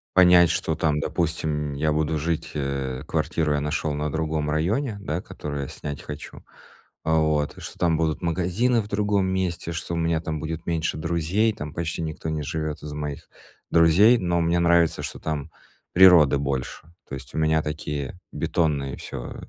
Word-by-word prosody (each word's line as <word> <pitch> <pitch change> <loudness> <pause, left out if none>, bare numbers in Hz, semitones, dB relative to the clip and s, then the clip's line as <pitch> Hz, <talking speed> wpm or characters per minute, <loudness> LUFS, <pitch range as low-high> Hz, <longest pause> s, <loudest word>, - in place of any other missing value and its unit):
Понять, 90 -2 +7
что, 80 -1 -1
там, 75 -1 +1
допустим, 75 -3 -1
я 75 +2 0
буду 80 +1 0
жить, 80 +1 -2
э, 70 -3 -3
квартиру 80 -1 0
я 75 - +1
нашёл 75 0 -1
на 75 0 -2
другом 80 -1 -1
районе, 100 - 0
да, 85 -3 -3
которую 75 -5 -5
я - - -5
снять 70 -2 -7
хочу, 75 -1 -8 0.6
а 80 - +2
вот, 75 -2 +1
что - - -9
там 80 -2 +2
будут 80 -2 0
магазины 95 +8 +1
в 105 - -9
другом 105 -2 +1
месте, 95 -3 -2
что 85 +1 -3
у - - -2
меня 80 -1 +1
там 80 -2 -3
будет 80 +2 -5
меньше 80 -2 -1
друзей, 85 +7 +1
там 75 -4 -7
почти 85 0 -3
никто 80 0 -4
не 75 -1 -2
живёт 75 +1 -4
из 75 -1 -6
моих 75 -1 -5 0.4
друзей, 90 +9 +6
но 85 -2 0
мне 85 +1 +2
нравится, 85 -1 +3
что - - -5
там 75 -3 -3 0.4
природы 85 -6 +7
больше. 70 +2 -3 0.2
То - - -4
есть 65 -2 -10
у - - 0
меня 80 0 +2
такие 75 +1 -4
бетонные 70 -5 -1
всё 65 -3 -7
80 Hz, 175 wpm, -24 LUFS, 75-85 Hz, 0.6 s, Понять